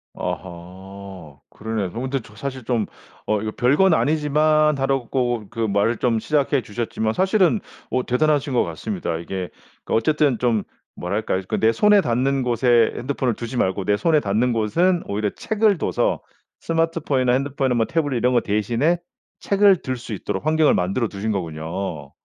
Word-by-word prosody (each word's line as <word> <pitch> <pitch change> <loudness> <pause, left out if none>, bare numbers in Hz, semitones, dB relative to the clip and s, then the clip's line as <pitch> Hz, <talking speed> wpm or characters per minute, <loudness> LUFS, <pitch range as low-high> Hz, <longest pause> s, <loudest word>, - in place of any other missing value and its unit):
아하. 95 -2 -8
그러네요. 110 -4 -4
저 115 - -6
근데 130 +1 -2 0.2
사실 130 +4 -5
좀 115 -2 0 0.4
"어 105 -1 +1
이거 110 0 -3
별건 145 - +3
아니지만" 155 0 +2
하라고 125 -4 -1
그 120 - -10
말을 110 +1 +1
좀 115 -2 +1
시작해 140 +3 +1
주셨지만 110 0 -3
사실은 190 - +2 0.3
어 130 - 0
대단하신 145 +2 +1
것 120 - +3
같습니다. 180 - -4
이게 90 +2 -5 0.4
그 - - -3
어쨌든 145 0 +2
좀 115 -4 +1 0.3
뭐랄까 95 +2 -2
그 - - -1
내 110 - +4
손에 210 - +4
닿는 130 0 0
곳에 120 -1 +3
핸드폰을 125 -2 -1
두지 120 +3 -6
말고 95 -2 0
내 105 0 +2
손에 160 +5 +3
닿는 115 +1 +1
곳은 170 - +1
오히려 105 +1 -1
책을 215 - +1
둬서 - - 0 0.4
스마트폰이나 165 -6 0
핸드폰이나 135 -1 0
뭐 115 -1 +2
태블릿 145 -4 -1
이런 125 +2 +2
거 120 - +3
대신에 115 - +1 0.4
책을 200 -2 +4
들 130 - -2
수 120 -2 -7
있도록 105 - -4
환경을 155 -1 +4
만들어 100 +7 0
두신 105 +2 -3
거군요. 80 -3 -4
120 Hz, 345 characters per minute, -22 LUFS, 105-150 Hz, 0.4 s, 내